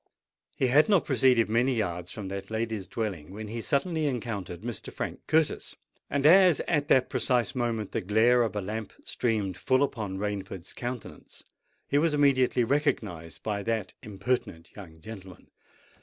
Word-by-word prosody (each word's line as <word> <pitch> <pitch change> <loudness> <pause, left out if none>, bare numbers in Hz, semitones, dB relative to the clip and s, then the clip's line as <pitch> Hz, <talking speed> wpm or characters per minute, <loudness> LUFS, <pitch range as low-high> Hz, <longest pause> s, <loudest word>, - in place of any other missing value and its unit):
He - - +2
had 145 - +4
not 200 -5 +4
proceeded 125 -3 +3
many 120 +4 +2
yards 90 -5 -2
from 105 -3 -6
that 100 0 -6
lady's 110 -3 -3
dwelling, 95 -10 -4
when 105 +1 -7
he 115 +1 -4
suddenly 155 +4 0
encountered 105 -9 -4
Mr. 115 -3 -6
Frank - - -5
Curtis; 160 -1 +1 0.3
and 140 0 -1
as 180 0 +7
at 150 -4 0
that 130 - +4
precise 125 -2 0
moment 115 -5 -2
the - - -1
glare 110 +6 +4
of 110 -4 -1
a 105 - -1
lamp 105 +2 -5
streamed 105 -6 -1
full 130 +7 +2
upon 110 -8 -3
Rainford's 100 -3 -5
countenance, 120 -2 -7 0.4
he 145 - +2
was 155 -1 +2
immediately 130 -3 +3
recognised 110 - -1
by 105 -2 -2
that 110 -1 -2
impertinent 100 -4 -3
young 80 -6 -11
gentleman. 95 -3 -11
115 Hz, 155 wpm, -28 LUFS, 100-130 Hz, 0.4 s, as